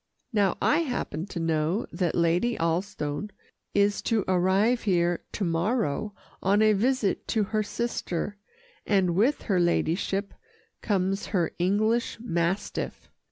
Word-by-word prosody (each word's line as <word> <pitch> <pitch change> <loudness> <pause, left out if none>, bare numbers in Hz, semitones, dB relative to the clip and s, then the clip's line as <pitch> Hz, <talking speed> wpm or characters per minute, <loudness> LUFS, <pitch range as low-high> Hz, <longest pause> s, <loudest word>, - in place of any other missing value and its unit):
Now 200 -4 +2
I 300 - +4
happen 245 - -3
to 180 - -5
know 165 +4 0
that 175 -4 -1
Lady 175 +8 +2
Alstone 170 0 -2 0.5
is 205 0 +3
to 225 -3 0
arrive 190 +6 +3
here 175 -3 +1
to 210 - -2
morrow 190 - 0 0.3
on 200 +3 +3
a 215 0 +5
visit 230 0 0
to 220 - +1
her 215 +2 0
sister, 205 -3 -3 0.5
and 190 -4 +2
with 230 +11 +2
her 190 -5 +1
ladyship 175 +3 0 0.5
comes 195 -1 0
her 175 -5 0
English 215 +6 +1
mastiff. 175 -4 -2
195 Hz, 125 wpm, -27 LUFS, 175-215 Hz, 0.5 s, a